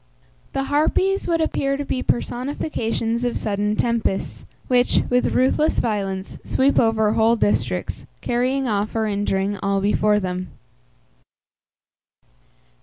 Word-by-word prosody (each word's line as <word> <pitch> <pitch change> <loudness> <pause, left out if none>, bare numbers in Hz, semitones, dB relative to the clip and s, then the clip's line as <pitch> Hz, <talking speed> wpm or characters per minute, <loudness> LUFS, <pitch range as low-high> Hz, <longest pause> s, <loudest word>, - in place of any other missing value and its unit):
The 270 - 0
Harpies 315 +7 +1
would 335 -2 +1
appear 275 -3 0
to 285 - -4
be 255 - -2
personifications 240 -3 -2
of 245 -1 0
sudden 210 0 -1
tempests, 230 -4 -1 0.2
which, 250 -1 +3
with 250 0 +2
ruthless 265 +4 +2
violence, 195 -4 -2
sweep 270 +2 +2
over 220 -2 +2
whole 225 +1 +4
districts, 205 - -1
carrying 255 +2 0
off 210 -1 -1
or 220 -1 +1
injuring 200 -1 -1
all 195 0 +1
before 210 +1 +2
them. 185 -1 -4
225 Hz, 115 wpm, -22 LUFS, 205-260 Hz, 0.2 s, whole